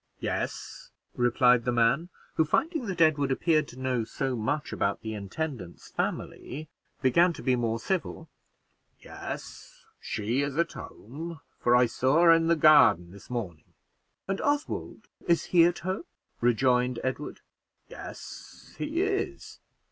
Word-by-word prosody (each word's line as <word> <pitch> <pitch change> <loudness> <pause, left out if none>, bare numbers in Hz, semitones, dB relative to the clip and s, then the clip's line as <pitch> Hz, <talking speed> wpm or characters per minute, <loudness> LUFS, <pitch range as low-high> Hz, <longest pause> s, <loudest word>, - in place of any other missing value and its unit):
"Yes," - - -4 0.3
replied 125 0 +4
the 125 - 0
man, 120 +8 +2 0.2
who, 160 - +3
finding 310 - 0
that 180 -3 -2
Edward 145 -4 +3
appeared 155 +2 +2
to 125 - -12
know 130 -3 0
so 130 +3 -3
much 140 +7 -2
about 100 0 -1
the 110 -1 -5
intendant's 105 - -6
family, 155 +3 -4 0.4
began 170 +7 +4
to - - -10
be 130 -1 +3
more 115 -2 0
civil. 165 +2 -3 0.7
"Yes, - - -9
she 115 +6 -1
is 140 0 -2
at 170 0 +1
home, 155 +8 -8 0.2
for 120 - +3
I 125 0 +6
saw 130 +7 +2
her 170 - +8
in 165 0 +4
the 170 - +4
garden 150 - +6
this 100 +1 -14
morning." 105 -11 -6 0.5
"And 195 0 -2
Oswald, 290 +1 -2 0.2
is 170 -1 +3
he 170 -2 +5
at 175 0 +1
home?" 190 - -2 0.3
rejoined 125 +1 +2
Edward. 130 +3 -4 0.5
"Yes, - - -10
he 325 +5 0
is. 400 0 -3
135 Hz, 140 wpm, -28 LUFS, 120-170 Hz, 0.7 s, her